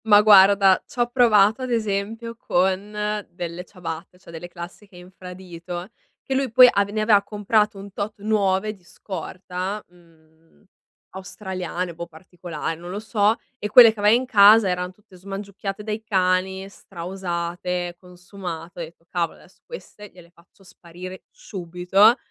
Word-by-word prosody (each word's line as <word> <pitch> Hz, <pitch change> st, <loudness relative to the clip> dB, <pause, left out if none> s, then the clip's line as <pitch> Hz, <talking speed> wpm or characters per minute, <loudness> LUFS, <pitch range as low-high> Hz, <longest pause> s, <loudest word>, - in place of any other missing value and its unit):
Ma 205 Hz, -2 st, +7 dB
guarda, 195 Hz, -2 st, +6 dB
c'ho 240 Hz, -1 st, -2 dB
provato 220 Hz, -2 st, +4 dB
ad 255 Hz, -, -4 dB
esempio 225 Hz, +1 st, -2 dB
con 190 Hz, -2 st, 0 dB, 0.4 s
delle 175 Hz, 0 st, -6 dB
ciabatte, 180 Hz, -2 st, -8 dB
cioè 180 Hz, -, -15 dB
delle 165 Hz, +1 st, -8 dB
classiche 175 Hz, +3 st, -11 dB
infradito 180 Hz, -1 st, -9 dB, 0.3 s
che 270 Hz, -, -3 dB
lui 265 Hz, 0 st, 0 dB
poi 250 Hz, +2 st, +9 dB
avev 200 Hz, -2 st, 0 dB
ne 215 Hz, -, 0 dB
aveva 210 Hz, -2 st, +4 dB
comprato 210 Hz, +1 st, 0 dB
un 200 Hz, 0 st, -10 dB
tot 210 Hz, +2 st, -4 dB
nuove 210 Hz, -1 st, +1 dB
di 190 Hz, -4 st, -21 dB
scorta, 185 Hz, +2 st, -6 dB
mhmm, 165 Hz, -1 st, -26 dB, 0.5 s
australiane, 185 Hz, -2 st, -5 dB
boh 170 Hz, +1 st, -7 dB
particolar 165 Hz, -1 st, -7 dB
non 175 Hz, +1 st, -9 dB
lo 195 Hz, +3 st, -4 dB
so, 215 Hz, 0 st, +1 dB, 0.2 s
e 210 Hz, -, -4 dB
quelle 230 Hz, 0 st, +9 dB
che 220 Hz, -, -13 dB
aveva 210 Hz, +2 st, +5 dB
in 255 Hz, +2 st, 0 dB
casa 215 Hz, -2 st, +7 dB
eran 180 Hz, 0 st, -2 dB
tutte 190 Hz, -1 st, -22 dB
smangiucchiate 195 Hz, +1 st, -6 dB
dai 215 Hz, 0 st, -4 dB
cani, 190 Hz, -1 st, 0 dB
stra 190 Hz, -3 st, -11 dB
usate, 175 Hz, -1 st, -4 dB
consumate, 180 Hz, -2 st, -9 dB
ho -, -, -3 dB
detto: 165 Hz, +1 st, -13 dB
"Cavolo, 170 Hz, -3 st, -2 dB
adesso -, -, -22 dB
queste 210 Hz, -, -11 dB
gliele 175 Hz, -2 st, -17 dB
faccio 175 Hz, +3 st, -25 dB
sparire 180 Hz, +1 st, -11 dB
subito". 190 Hz, +4 st, +2 dB
190 Hz, 150 wpm, -23 LUFS, 175-210 Hz, 0.5 s, poi